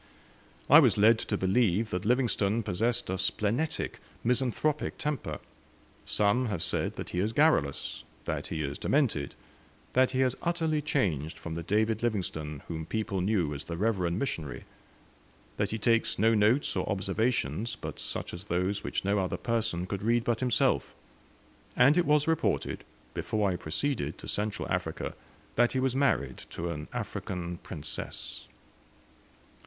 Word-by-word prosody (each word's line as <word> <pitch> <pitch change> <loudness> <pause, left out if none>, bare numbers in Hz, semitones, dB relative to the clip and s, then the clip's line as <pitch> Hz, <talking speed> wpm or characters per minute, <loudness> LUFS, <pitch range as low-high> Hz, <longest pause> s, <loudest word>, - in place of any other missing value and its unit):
I 150 - +10
was 120 -9 +4
led 110 +2 +6
to 105 - -1
believe 105 +1 +2
that 90 +2 -2
Livingstone 115 -3 +2
possessed 115 +3 0
a 95 - -1
splenetic, 105 +10 0 0.2
misanthropic 130 +5 0
temper; 150 -4 -2 0.7
some 105 +5 +2
have 100 -7 -1
said - - 0
that - - -6
he 90 - -1
is 105 +4 0
garrulous, 75 - +2 0.2
that - - -2
he 80 -1 -2
is 70 0 -4
demented; 120 - +1 0.6
that 130 0 +5
he 130 0 0
has 130 -1 +2
utterly 165 -3 0
changed 85 - 0
from 85 - -6
the 85 - -3
David 110 +5 +1
Livingstone 80 -10 -2
whom 80 -2 -5
people 105 -3 -1
knew 90 -6 +1
as 70 - -6
the 85 - -5
reverend 95 -4 +1
missionary; 80 - -3 0.9
that - - +1
he 110 - -2
takes 115 +1 +2
no 115 +3 +4
notes 110 +6 +3
or - - -1
observations 105 - 0
but - - -7
such - - -4
as 85 +3 -7
those 90 +2 0
which - - -2
no 100 +1 +2
other 95 -1 -1
person 115 -7 -1
could 100 +1 -4
read 115 +2 +2
but 115 -1 0
himself; 125 -3 +1 0.8
and 135 +4 +6
it 175 -1 +2
was 150 0 +4
reported, 160 -1 0 0.3
before 105 -3 0
I - - -1
proceeded 95 - -1
to - - -10
Central 105 0 -2
Africa, - - -2 0.4
that 120 0 +4
he 130 - +1
was 130 -1 +1
married 70 - +1
to 85 +1 -3
an 75 -1 -5
African 90 -2 -4
princess. 75 -6 -5
105 Hz, 155 wpm, -29 LUFS, 90-125 Hz, 0.9 s, I